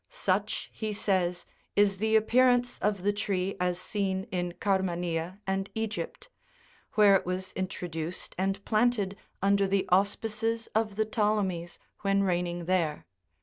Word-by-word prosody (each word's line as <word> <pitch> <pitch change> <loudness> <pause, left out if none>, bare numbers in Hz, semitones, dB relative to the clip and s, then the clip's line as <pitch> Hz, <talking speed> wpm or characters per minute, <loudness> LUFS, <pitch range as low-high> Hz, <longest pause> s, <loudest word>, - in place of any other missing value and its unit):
Such, - - -1
he 215 -1 -3
says, 185 -4 0 0.3
is 200 -2 +3
the 220 +1 +2
appearance 245 +2 +4
of 205 -3 0
the 205 +1 +2
tree 195 -2 -1
as 180 0 0
seen 190 0 -1
in 175 -1 -2
Carmania 180 -2 -1
and 195 0 -1
Egypt, 220 0 -4 0.7
where 205 -2 +6
it - - +2
was 185 +1 -3
introduced 175 -2 -4
and 195 +1 -1
planted 215 -3 +2 0.3
under 200 0 +4
the 195 0 +1
auspices 220 +4 +1
of 215 -2 0
the 220 +1 +1
Ptolemies 205 -6 0 0.2
when 200 0 +2
reigning 175 -2 -1
there. 170 -4 0
195 Hz, 135 wpm, -29 LUFS, 180-210 Hz, 0.7 s, where